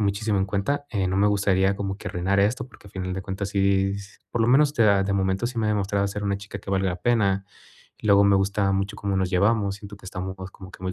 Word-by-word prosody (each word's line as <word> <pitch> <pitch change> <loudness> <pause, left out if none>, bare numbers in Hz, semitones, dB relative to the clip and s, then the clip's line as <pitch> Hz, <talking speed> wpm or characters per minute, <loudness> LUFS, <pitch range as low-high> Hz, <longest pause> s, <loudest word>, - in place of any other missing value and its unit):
muchísimo 100 +1 0
en 95 - +2
cuenta, 105 +9 -1
eh, 100 -4 0
no 95 - -1
me 100 +1 +4
gustaría 100 -1 +2
como 100 -1 -3
que - - -6
arruinar 95 +3 0
esto, 120 +6 +1
porque, 105 - -16
al - - -21
final 95 -1 -4
de 95 - -4
cuentas, 95 +1 -4
sí, 95 -1 +2
s 100 0 -11
por 120 - -1
lo 115 - +2
menos, 145 +3 +4
te 115 - +3
da 100 -2 +4
de 100 - -1
momento, 95 +3 0
sí 125 0 -6
me 110 - +1
ha - - +1
demostrado 100 -1 0
ser 105 +1 -5
una 100 -1 0
chica 100 0 -8
que 100 - -15
valga 95 0 +1
la 90 - -3
pena. 100 -5 +2 0.6
Luego, 100 -1 +5
me 100 - +5
gusta 100 0 +1
mucho 100 +2 -1
cómo 100 -1 -2
nos 95 -1 0
llevamos, 100 +1 +2
siento 100 0 -10
que 100 - -19
estamos 95 0 -5 0.2
como 95 -2 -12
que - - -13
muy 95 0 -2
100 Hz, 270 wpm, -24 LUFS, 95-105 Hz, 0.6 s, Luego